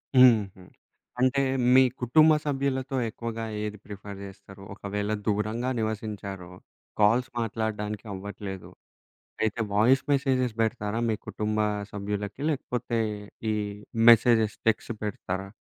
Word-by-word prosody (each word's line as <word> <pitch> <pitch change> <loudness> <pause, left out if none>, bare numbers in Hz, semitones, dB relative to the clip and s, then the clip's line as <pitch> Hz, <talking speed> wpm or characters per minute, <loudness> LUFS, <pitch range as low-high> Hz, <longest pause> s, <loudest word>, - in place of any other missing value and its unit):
హుహు. 110 -7 +5 0.6
అంటే 130 +2 +3 0.3
మీ 130 - +9 0.2
కుటుంబ 155 +6 +5
సభ్యులతో 135 -2 -1
ఎక్కువగా 115 0 -5 0.2
ఏది 105 0 -4
ప్రిఫర్ 100 -1 -8
చేస్తారు? 100 0 -12
ఒకవేళ 105 +1 -3 0.2
దూరంగా 110 +4 0
నివసించారో, 105 -4 -4 0.5
కాల్స్ 115 +5 +4
మాట్లాడడానికి 110 -1 -3
అవ్వట్లేదు, 95 -1 -7 0.7
అయితే 110 +1 0
వాయిస్ 125 +6 +4
మెసేజెస్ 130 -4 +1
బెడతారా? 105 -1 -1
మీ 110 - 0
కుటుంబ 105 0 -2 0.3
సభ్యులకి 105 +3 -4
లేకపోతే, 125 -4 -2 0.5
ఈ - - 0 0.6
మెసేజెస్ 110 -2 +5
టెక్స్ట్ 110 +1 0
పెడతారా? 95 -2 -4
110 Hz, 105 wpm, -27 LUFS, 105-125 Hz, 0.7 s, మీ